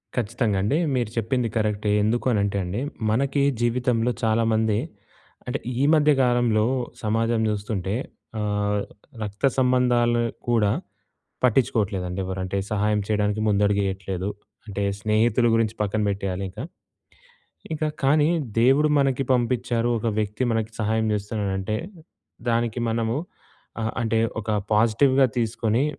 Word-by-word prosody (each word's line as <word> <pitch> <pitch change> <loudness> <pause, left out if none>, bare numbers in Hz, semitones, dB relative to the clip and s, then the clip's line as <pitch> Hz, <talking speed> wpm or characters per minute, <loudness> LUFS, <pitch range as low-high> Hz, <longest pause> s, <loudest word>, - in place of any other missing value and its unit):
ఖచ్చితంగా 115 -3 0
అండి. 105 +10 +1 0.2
మీరు 120 -4 0
చెప్పింది 120 +2 0
కరెక్టే. 105 -1 0
ఎందుకు 115 +3 0
అని 105 - +2
అంటే 100 0 -1
అండి, 90 +6 -3 0.3
మనకి 140 +4 +1 0.2
జీవితంలో 120 0 +1
చాలామంది 110 -1 +2 0.7
అంటే 125 +3 -2 0.2
ఈ - - +3
మధ్య 150 -1 +4
కాలంలో 120 -3 +2 0.4
సమాజం 115 +1 +1
చూస్తుంటే 100 -2 -2 0.5
ఆహ్, 105 -1 0 0.4
రక్త 105 +5 -3
సంబంధాలు 125 -2 +3 0.3
కూడా 110 -4 +3 0.7
పట్టించుకోవట్లేదండి 100 -7 +1
ఎవరు. 95 0 -4
అంటే 95 +1 -3
సహాయం 105 0 +1
చేయడానికి 105 0 0
ముందడుగు 100 0 +2
ఏయట్లేదు. 95 0 -4 0.4
అంటే 100 -1 -4 0.2
స్నేహితుల 110 +2 +2
గురించి 115 -1 +1
పక్కన 105 +1 -1
పెట్టేయాలి 100 -1 -2
ఇంకా. 105 +7 -7 1.1
ఇంకా 155 0 -1 0.2
కానీ, 150 +2 +4 0.3
దేవుడు 135 +5 +4
మనకి 135 -1 +1
పంపించారు. 120 -1 +1
ఒక 110 - -4
వ్యక్తి 105 +2 -2
మనకి 115 0 -1
సహాయం 110 +1 +1
చేస్తున్నాడు 105 -1 -2
అంటే 105 +3 -2 0.7
దానికి 115 0 0
మనము 115 +1 0 0.7
ఆహ్, 110 - -1
అంటే 115 -1 +1 0.2
ఒక 105 - -14 0.3
పాజిటివ్‌గా 130 +5 +4
తీసుకొని 115 +2 0
110 Hz, 120 wpm, -24 LUFS, 105-120 Hz, 1.1 s, మధ్య